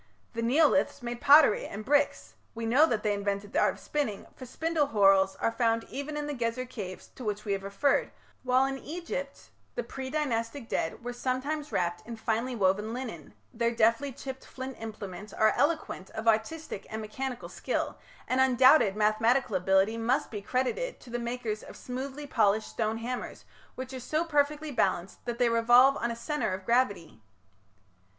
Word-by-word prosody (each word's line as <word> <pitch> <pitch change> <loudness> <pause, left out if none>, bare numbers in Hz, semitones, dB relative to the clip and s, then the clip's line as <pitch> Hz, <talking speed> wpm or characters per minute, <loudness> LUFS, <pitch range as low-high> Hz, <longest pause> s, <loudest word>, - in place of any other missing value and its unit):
The 230 - -3
Neoliths 285 +2 +3
made 240 0 -5
pottery 290 -5 +6
and 210 +2 -7
bricks; 290 +1 +1 0.2
we 230 0 -4
know 265 +8 +5
that 220 -6 -1
they 210 -1 +2
invented 200 0 -3
the - - +2
art - - +3
of - - -15
spinning, 280 -10 -2
for 255 - -10
spindle 320 +3 0
whorls 195 -4 +4
are 230 - 0
found 230 -1 +1
even 290 +2 -4
in 295 - -2
the 295 - -3
Gezer 240 0 -2
caves 190 -7 -8
to 255 - -10
which 210 -1 -3
we 205 - -2
have 195 -1 0
referred, 200 +8 +1 0.3
while 255 +1 +3
in 270 0 -3
Egypt 295 -4 -6 0.2
the 240 - -2
pre 260 +3 -6
Dynastic 250 -4 -2
dead 165 +4 -2
were 245 - -3
sometimes 275 +5 -2
wrapped 175 -1 -1
in 235 - -5
finely 230 +3 -1
woven 205 +2 +1
linen: 225 - -7 0.2
their 235 0 +1
deftly 230 +4 +2
chipped 265 +1 -8
flint 260 0 -7
implements 210 -2 -7
are 220 0 +3
eloquent 290 - 0
of 220 +1 -4
artistic 225 +2 0
and 220 - -4
mechanical 245 +4 -5
skill, - - -3 0.3
and 255 +1 +2
undoubted 260 -4 +5
mathematical 220 +2 +2
ability 190 +4 +2
must 250 +6 0
be 210 -3 -5
credited 260 - -1
to 245 - -14
the 240 - -2
makers 235 -3 -3
of - - -11
smoothly 265 +3 -6
polished 215 -5 +2
stone 220 -1 -1
hammers 240 +2 -5 0.3
which 260 +1 -6
are 260 - -5
so 310 +7 -1
perfectly 300 -1 0
balanced 190 -6 -1
that 240 -1 -3
they 245 -1 +3
revolve 240 +4 +6
on 235 - -1
a 235 - -3
centre 235 -4 -2
of 190 0 -10
gravity. 205 - 0
240 Hz, 180 wpm, -29 LUFS, 215-270 Hz, 0.3 s, pottery